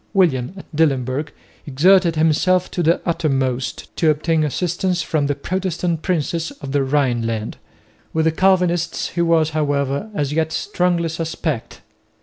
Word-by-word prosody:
William 165 -5 +2
at 190 - -10
Dillenburg 140 -1 +1 0.4
exerted 170 +5 +4
himself 165 +4 +2
to 175 - -2
the 170 +1 +3
uttermost 135 -6 -1
to 160 - +3
obtain 155 +1 +1
assistance 175 +3 -1
from 150 -3 0
the 145 - 0
Protestant 175 -2 -2
princes 165 -2 -1
of 140 -3 -9
the 140 0 +2
Rhineland. 120 -6 -1 0.5
With 160 0 0
the 160 - +4
Calvinists 175 -1 +1
he 170 - -2
was, 165 -2 +3
however, 145 +3 -1
as 145 -4 -1
yet 160 0 0
strongly 175 -1 0
suspect. 160 -5 -4
160 Hz, 135 wpm, -20 LUFS, 145-175 Hz, 0.5 s, exerted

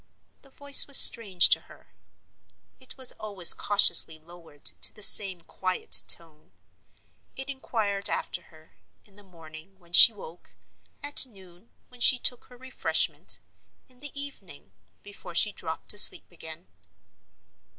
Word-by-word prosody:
The 275 - -21
voice 285 +1 +2
was 280 - +4
strange 195 -7 +4
to - - 0
her; - - -22 0.9
it 260 +1 -10
was 260 -1 0
always 200 -5 +3
cautiously 175 -5 +1
lowered 165 -2 -21 0.2
to - - -3
the 210 - -7
same 190 -4 +4
quiet 185 +2 -4
tone. 155 - -4 0.8
It 265 +1 -9
inquired 215 -7 -5
after - - -7
her, 155 0 -24 0.3
in 200 - -24
the 205 - -20
morning, 165 0 -18
when 175 -2 -26
she 230 - +9
woke—at 220 - -6
noon, 190 -2 -21 0.2
when 250 -1 -20
she 255 - +4
took 245 0 -4
her 250 - -21
refreshment—in 255 0 -5
the 285 0 -11
evening, 235 - -13 0.3
before 190 -4 -14
she 210 - 0
dropped 160 -2 -6
asleep 205 - +4
again. 160 0 -14
195 Hz, 130 wpm, -23 LUFS, 170-250 Hz, 0.9 s, she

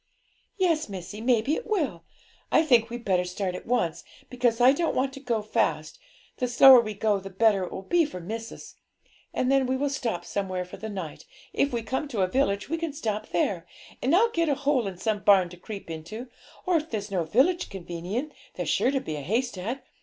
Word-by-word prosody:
'Yes, 330 - +1
missie, 195 +2 -7
maybe 240 +3 +2
it 480 - -3
will. 285 - -1 0.5
I - - +5
think 235 -6 +4
we'd 240 0 -7
better 185 -2 +2
start 180 +1 -3
at 180 - -8
once, 225 -10 0 0.3
because 245 -2 +1
I 250 +2 +7
don't 325 +4 0
want 265 +1 0
to 275 - -8
go 235 -5 -1
fast; 215 - -1 0.4
the 250 - 0
slower 250 +1 +8
we 215 -2 -5
go 205 0 +1
the 195 0 -8
better 195 0 +3
it - - -9
will 190 - -6
be 345 - +3
for 240 -11 -7
missis; 225 +6 -7 0.6
and 255 - 0
then 270 -1 +3
we 260 +1 0
will 285 +1 0
stop 225 -11 -3
somewhere 185 -2 -3
for 180 - -10
the 220 - -6
night; 185 -7 -6 0.3
if 285 - +1
we 235 -2 -2
come 260 +6 -2
to 230 -8 -2
a 185 - +3
village, 200 -3 0
we 330 - -2
can 330 -3 -3
stop 215 -8 -3
there, 175 0 -1 0.3
and 270 +7 +3
I'll 460 +5 +4
get 335 -4 +1
a 285 - +2
hole 275 -5 +1
in 190 -2 -6
some 210 +3 -1
barn 195 -3 +5
to 180 - -12
creep 200 +2 -8
into, 215 +11 -7 0.4
or 365 -2 +3
if 310 0 -4
there's 210 -2 -4
no 180 -3 0
village 275 - +2
convenient, 190 - -5 0.2
there's - - -3
sure - - +2
to 270 -1 0
be 155 -8 -5
a - - -5
haystack. 230 - -2
225 Hz, 215 wpm, -26 LUFS, 190-270 Hz, 0.6 s, slower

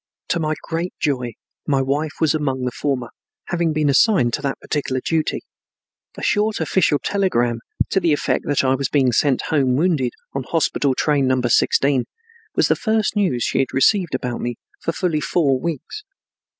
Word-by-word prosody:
To 170 - +1
my 155 -1 -1
great 170 +2 -3
joy 125 -5 -1 0.3
my 140 -2 +2
wife 145 +3 -1
was 160 -3 +3
among 135 -4 -1
the 125 - -1
former, 125 -3 -2 0.4
having 170 -2 0
been 155 -1 +1
assigned 140 - +3
to - - -1
that 140 -1 -2
particular 135 -3 -2
duty. 160 +4 -1 0.8
A - - -7
short 210 +1 +1
official 165 -5 +2
telegram 120 - 0 0.3
to 195 - +3
the 170 -4 +1
effect 145 - 0
that 145 -1 +2
I 130 0 +3
was 135 +1 -1
being 135 -4 +3
sent 130 +2 +2
home 135 -5 +2
wounded 150 -5 +1 0.2
on 135 - -2
hospital 140 -2 0
train 145 -2 +1
Number 130 -2 +1
16 135 +2 +3 0.5
was - - +3
the - - +3
first 220 -1 0
news 180 - +1
she - - 0
had 135 - 0
received 175 +2 +3
about 125 -2 -3
me 120 0 -3 0.3
for - - -1
fully 165 -3 -1
four 150 -5 +1
weeks. 170 - -5
145 Hz, 175 wpm, -21 LUFS, 130-165 Hz, 0.8 s, was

